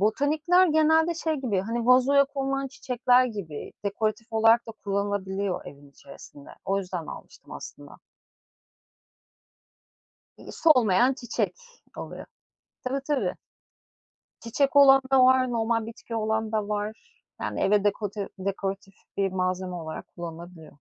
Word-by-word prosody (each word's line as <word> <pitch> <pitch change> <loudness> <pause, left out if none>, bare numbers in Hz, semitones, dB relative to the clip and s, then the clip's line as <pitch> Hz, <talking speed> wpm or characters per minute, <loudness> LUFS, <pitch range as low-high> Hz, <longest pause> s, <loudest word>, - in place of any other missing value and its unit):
botanikler 305 - +3
genelde 320 +1 +3
şey 320 -1 -1
gibi, 245 -10 -1
hani, 230 +4 -3
vazoya 260 +3 +5
konulan 275 -1 -3
çiçekler 250 -1 +2
gibi 200 -11 -6
dekoratif 215 +2 -2
olarak 225 +2 +4
da - - -6
kullanılabiliyor 200 -1 -2
evin 140 0 -13
içerisinde 140 0 -14
o 195 +1 0
yüzden 180 -4 -5
almıştım - - -11
aslında. - - -10 2.4
İii, - - -11
solmayan 250 - +4
çiçek 240 -3 -3 0.4
oluyor. - - -8 0.6
Tabii 260 +2 -1
tabii. 295 -3 0 1.1
Çiçek 275 +5 -1
olan 270 -1 +8
da 260 -1 +6
var 255 0 +4
normal 230 -1 0
bitki 230 0 -9
olan 220 0 -1
da 215 -2 -1
var, 210 +1 -3 0.4
yani, - - -3
eve 205 0 +2
dekote 205 -1 -2
dekoratif 195 0 -4 0.2
bir 195 -1 0
malzeme 185 0 -2
olarak 160 -2 -7
kullanılabiliyor. 170 -1 -10
220 Hz, 120 wpm, -26 LUFS, 195-260 Hz, 2.4 s, olan